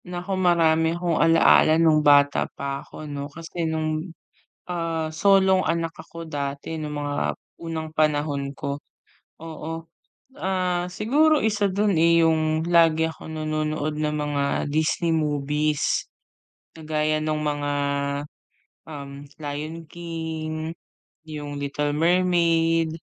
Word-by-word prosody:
Naku 180 +2 -4
marami 165 -3 +3
akong 175 -3 0
alaala 165 -1 +5
nong 160 -2 +4
bata 145 -1 +4
pa 140 0 -3
ako 155 - -10
'no 145 -1 -5
kasi 165 +2 -4
nong, 155 +2 -2 0.6
ah, 165 -2 -2
solong 190 +3 +4
anak 165 0 -1
ako 165 -1 -9
dati 140 +1 -4
nong 155 -1 -5
mga 145 -1 -3 0.5
unang 160 -1 -4
panahon 145 -2 0
ko. 140 0 -4 0.6
Oo, 165 0 -7 0.5
ah, 180 -2 0
siguro 285 - +2
isa 210 -2 +1
don, 200 +2 +1
eh, 170 +1 +5
yung 160 -1 +2
lagi 165 -1 +4
ako - - -12
nanonood 155 -1 -2
ng 150 0 -1
mga 145 -1 -1 0.3
Disney 160 +3 +1
movies 150 -1 0 0.7
kagaya 155 -1 -1
nung 155 0 -1
mga, 145 -1 -1 1.2
um, 140 -1 -8
Lion 155 +2 -5
King, 160 -1 -5 0.5
yung 150 -2 -6
Little 145 +1 -2
Mermaid, 165 -1 +2
160 Hz, 115 wpm, -24 LUFS, 150-165 Hz, 1.2 s, alaala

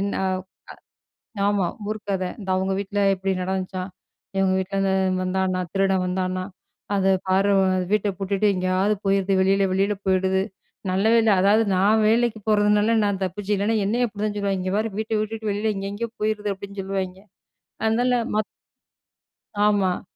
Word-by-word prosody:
என்ன 200 0 -1
அ - - +1 1.2
ஆமாம். 200 -4 0
ஊர் 215 - -3
கத 190 -2 0 0.2
"இந்த 190 - -7
அவங்க 190 +1 0
வீட்ல 200 +1 -3
இப்டி 190 0 -2
நடந்துச்சாம், 185 0 -3 0.5
எங்க 195 0 +3
வீட்லருந்து 195 +1 0 0.3
வந்தானா 185 0 0
திருடன் 195 -1 +2
வந்தானா 185 0 -2 0.5
அத 195 -1 +3 0.2
பார்வன் 190 -1 +2
வீட்ட 210 -1 +2
பூட்டிட்டு 200 +1 +1
எங்கேயாவது 185 +3 +1
போயிருது 195 0 +2
வெளில 195 +1 +3
வெளில 200 +2 +1
போயிடுது." 190 0 +2 0.5
நல்ல 190 +3 +1
வேலை 225 -2 +4
அதாவது 205 +3 +4
நான் 210 +4 +3
வேலைக்கு 230 0 +2
போறதுனால 210 +1 +3
நான் 200 -1 -1
தப்பிச்சு 195 +3 -2
இல்லைன்னா, 205 +3 +1
என்னையும் 240 +4 +1
அப்டி 210 -1 -6
தான் 210 -1 -2
சொல்லுவாங்கே 200 -2 -1
இங்கே 185 +1 -2
பாரு 220 +1 0
வீட்ட 220 0 -3
விட்டுட்டு 220 0 -4
வெளில 210 +2 0
எங்கே 195 0 -4
எங்கேயோ 230 +3 -4
போயிருது 210 -1 0
அப்டின்னு 200 +1 -9
சொல்லுவாங்க 190 -1 -4 0.7
அதனால 245 +3 +2 0.2
ம - - 0 1.3
ஆமா. 195 -3 +2
195 Hz, 150 wpm, -23 LUFS, 190-210 Hz, 1.3 s, வேலை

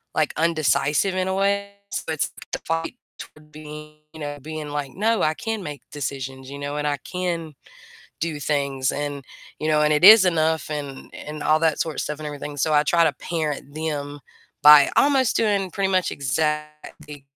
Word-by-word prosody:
like, 155 -1 +1
indecisive, 160 +2 +1
in 185 0 0
a 190 - -1
way, 200 +1 0 0.2
so - - -3
it's 155 - -2 0.2
the - - -1
fight 165 +6 -3 0.2
toward 150 0 -13
being, 150 0 -10 0.2
you 160 - -11
know 145 0 -5
being 155 +1 -6
like, 145 -2 -4
"No, 220 +3 +1
I 155 - +2
can 225 +5 -4
make 150 -5 -7
decisions, 135 -2 -5
you 140 +1 -8
know, 145 +1 -4
and 150 0 -1
I 145 - 0
can 170 -4 -4 0.7
do 160 -3 -2
things 140 -3 0
and 145 -2 -4 0.3
you 155 - -2
know, 150 -1 +3
and 150 - +3
it 150 +4 +4
is 215 0 +10
enough," 160 -3 +1
and 145 -3 -6
and 150 0 -7
all 155 +1 +3
that 160 -1 +1
sort 160 - -3
of - - -2
stuff 150 - -4
and 155 - -7
everything, 145 0 -6
so 155 +2 +1
I 150 0 +5
try 170 +2 +3
to 160 - +3
parent 150 -2 -4
them 145 -2 -4 0.4
by 150 -1 +9
almost 270 -4 +3
doing 200 -4 +1
pretty 195 +1 0
much 185 -1 +1
exactly 150 +1 -3
150 Hz, 190 wpm, -23 LUFS, 145-165 Hz, 0.7 s, is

